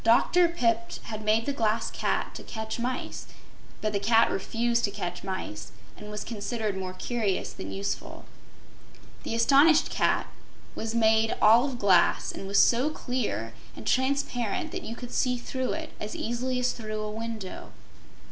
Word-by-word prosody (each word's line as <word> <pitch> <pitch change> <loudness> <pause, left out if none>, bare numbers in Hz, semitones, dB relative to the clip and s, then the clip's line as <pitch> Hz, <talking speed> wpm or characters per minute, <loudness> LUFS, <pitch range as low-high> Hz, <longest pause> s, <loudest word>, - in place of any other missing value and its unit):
Dr. 340 +10 +5
Pipt 230 -8 0
had 215 -1 -6
made 220 +2 +2
the 280 - -1
Glass 225 -3 0
Cat - - -1
to - - -8
catch 220 +1 -5
mice, 250 +2 -3 0.5
but 215 0 -1
the 200 - +1
Cat 225 +3 +4
refused 235 +4 0
to - - -2
catch 180 -3 -5
mice 150 - -5 0.2
and 210 - -10
was 210 0 -4
considered 220 -1 -3
more 185 -1 -4
curious 215 -2 -1
than 95 - -7
useful. 100 +1 -4 1.0
This 230 0 0
astonished 295 +5 +5
cat - - +2 0.5
was 225 +1 -4
made 220 -1 +3
all 230 +4 +6
of 265 -3 -4
glass 190 -6 +3
and 195 - -7
was 200 - +1
so 250 +5 +5
clear 215 - -3 0.2
and 110 - -10
transparent 260 -4 0
that - - -4
you 230 - -6
could 245 0 -8
see 250 -1 +1
through 260 +1 -3
it 320 0 -5
as 210 - -5
easily 250 +2 -2
as 250 0 +2
through 215 -2 -5
a 210 0 -3
window. 220 -3 -6
225 Hz, 165 wpm, -27 LUFS, 210-245 Hz, 1.0 s, all